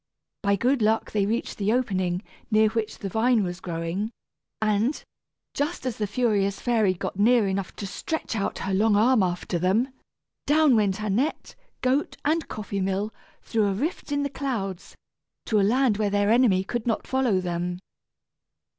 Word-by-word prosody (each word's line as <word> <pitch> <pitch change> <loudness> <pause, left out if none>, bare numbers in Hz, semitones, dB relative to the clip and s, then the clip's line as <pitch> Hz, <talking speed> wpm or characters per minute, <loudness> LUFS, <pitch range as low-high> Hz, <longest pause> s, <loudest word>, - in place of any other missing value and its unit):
By 200 0 +2
good 250 +5 +1
luck 220 +1 +1
they 200 -2 +1
reached 230 +1 -2
the 205 +1 +1
opening, 185 -7 0 0.3
near 215 0 +4
which 220 -1 -3
the 200 - -5
vine 225 +3 +2
was 175 -1 -4
growing, 170 +4 -3 0.5
and, 215 +6 +1 0.5
just 290 0 -2
as 250 -4 -2
the 210 - -1
furious 200 -3 +1
fairy 220 -6 +2
got 190 +1 -5
near 230 0 +4
enough 190 -1 -3
to 205 - -5
stretch 230 - -4
out 200 -2 -2
her 190 0 -3
long 210 +2 +3
arm 230 +2 +4
after 175 -1 -1
them, 200 +9 +2 0.6
down 295 -2 +5
went 205 -2 +1
Annette, 215 +9 -1 0.3
goat, 265 +3 0
and 320 +2 +1
coffee 200 -2 -4
mill, 195 +3 -1 0.3
through 220 -3 +1
a 195 - 0
rift 295 - -3
in 285 0 +1
the 285 - -1
clouds, 210 -11 -4 0.5
to 215 - +2
a - - +4
land 230 +2 +3
where 210 -1 +1
their 205 +1 +2
enemy 225 -6 +4
could 240 +4 -4
not 225 - 0
follow 260 -7 +1
them. 175 0 -2
215 Hz, 170 wpm, -25 LUFS, 195-245 Hz, 0.6 s, down